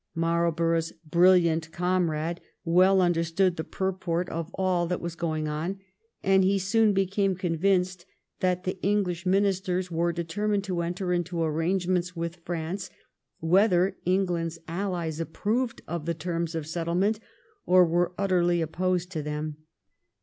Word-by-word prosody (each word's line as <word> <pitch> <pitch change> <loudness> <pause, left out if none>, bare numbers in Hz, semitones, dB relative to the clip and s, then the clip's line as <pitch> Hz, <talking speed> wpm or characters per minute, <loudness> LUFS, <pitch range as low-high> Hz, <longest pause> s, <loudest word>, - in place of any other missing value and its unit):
Marlborough's 165 0 +1
brilliant 170 -1 +4
comrade 170 -2 0 0.2
well 185 +3 +5
understood 175 +1 +2
the 160 - -3
purport 180 -2 -2
of 165 0 -4
all 185 -2 +1
that 180 +1 -1
was 170 -1 -4
going 160 -2 -2
on, 160 +6 -3 0.5
and 190 0 +4
he 195 +1 +3
soon 210 +3 +3
became 195 0 +1
convinced 180 +1 0 0.3
that 180 -1 0
the 185 0 -4
English 190 -3 0
Ministers 185 -1 +1
were 170 +1 +1
determined 200 +5 -1
to 185 -3 -2
enter 180 +2 -2
into 175 -1 -1
arrangements 175 +3 0
with 170 +1 -4
France 175 +3 -4 0.5
whether 185 +2 +3
England's 175 -3 0
Allies 170 -3 -3
approved 220 +9 -2
of 170 -1 -4
the 170 - 0
terms 165 0 -3
of 160 -2 -3
settlement 175 +6 0 0.5
or 180 0 +6
were 175 +2 +1
utterly 175 -3 +2
opposed 180 +2 -1
to 160 -4 -3
them. 150 0 -4
175 Hz, 135 wpm, -27 LUFS, 165-185 Hz, 0.5 s, or